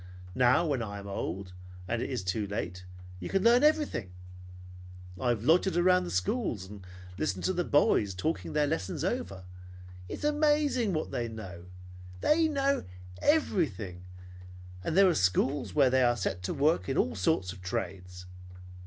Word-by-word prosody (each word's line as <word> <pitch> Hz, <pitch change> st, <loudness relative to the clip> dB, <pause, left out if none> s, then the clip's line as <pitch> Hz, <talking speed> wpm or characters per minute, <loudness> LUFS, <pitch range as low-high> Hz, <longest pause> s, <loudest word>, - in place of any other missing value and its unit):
Now 125 Hz, -, +4 dB
when 140 Hz, -6 st, 0 dB
I 100 Hz, -2 st, -5 dB
am 100 Hz, -, -9 dB
old 95 Hz, -1 st, -5 dB, 0.3 s
and 115 Hz, +3 st, -1 dB
it -, -, -3 dB
is 125 Hz, -7 st, -3 dB
too 95 Hz, +3 st, -1 dB
late, 90 Hz, -2 st, -5 dB, 0.3 s
you 90 Hz, -, -6 dB
can 195 Hz, -, +1 dB
learn 240 Hz, +3 st, +5 dB
everything. 295 Hz, -, +1 dB, 1.1 s
I 125 Hz, -, 0 dB
have 115 Hz, -3 st, 0 dB
loitered 170 Hz, +5 st, +3 dB
around 180 Hz, +1 st, +4 dB
the -, -, -5 dB
schools 95 Hz, -, -1 dB
and 100 Hz, -1 st, -11 dB, 0.4 s
listened 95 Hz, -1 st, -2 dB
to 185 Hz, -, +1 dB
the 175 Hz, -1 st, 0 dB
boys 105 Hz, -, +2 dB
talking 155 Hz, -, -2 dB
their 150 Hz, -1 st, +2 dB
lessons 145 Hz, -, -2 dB
over. 95 Hz, -1 st, -3 dB, 0.7 s
It -, -, -4 dB
is -, -, -11 dB
amazing 295 Hz, -7 st, +2 dB
what 155 Hz, -, -2 dB
they 120 Hz, -1 st, -2 dB
know. 95 Hz, -6 st, -9 dB, 0.5 s
Why, -, -, +4 dB
they 325 Hz, 0 st, +3 dB
know 280 Hz, -2 st, +1 dB, 0.4 s
everything! 120 Hz, -, 0 dB, 0.8 s
And 160 Hz, -, -1 dB
there 195 Hz, 0 st, +7 dB
are 180 Hz, -, +4 dB
schools 115 Hz, -, +1 dB
where 135 Hz, -4 st, +5 dB
they 130 Hz, 0 st, +3 dB
are 120 Hz, -1 st, +3 dB
set 95 Hz, -5 st, -2 dB
to -, -, -2 dB
work 150 Hz, +2 st, +1 dB
at 135 Hz, -, -1 dB
all 125 Hz, -, +1 dB
sorts 90 Hz, -, 0 dB
of 95 Hz, -, -13 dB
trades. 90 Hz, 0 st, -5 dB
120 Hz, 170 wpm, -29 LUFS, -, 1.1 s, there